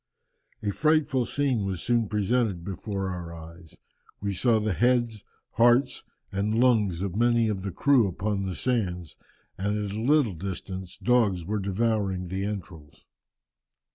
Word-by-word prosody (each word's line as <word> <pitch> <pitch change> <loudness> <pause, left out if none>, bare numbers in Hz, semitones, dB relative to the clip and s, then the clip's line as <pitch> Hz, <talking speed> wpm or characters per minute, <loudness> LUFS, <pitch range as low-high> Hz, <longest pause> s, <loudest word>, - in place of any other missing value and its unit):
"A 105 - 0
frightful 150 -2 +2
scene 135 -7 0
was 95 -2 -2
soon 120 -2 +1
presented 105 -4 0
before 95 0 -4
our 85 -2 -6
eyes. 80 0 -13 0.4
We 100 0 -2
saw 115 +4 +3
the 105 -2 0
heads, 120 -1 +1 0.3
hearts, 120 +3 +3 0.3
and 105 +3 0
lungs 105 -8 +3
of 95 -2 -3
many 120 0 +3
of 100 -3 -2
the 100 - -3
crew 125 - +3
upon 100 +1 -2
the 95 - -4
sands, 90 - -2 0.4
and 105 +2 0
at 105 -1 -3
a 110 - -3
little 135 -4 +3
distance 95 +1 -6
dogs 110 -9 +2
were 105 +3 -1
devouring 100 -2 -1
the 95 +2 -2
entrails." 85 -8 -7
105 Hz, 145 wpm, -27 LUFS, 95-120 Hz, 0.4 s, saw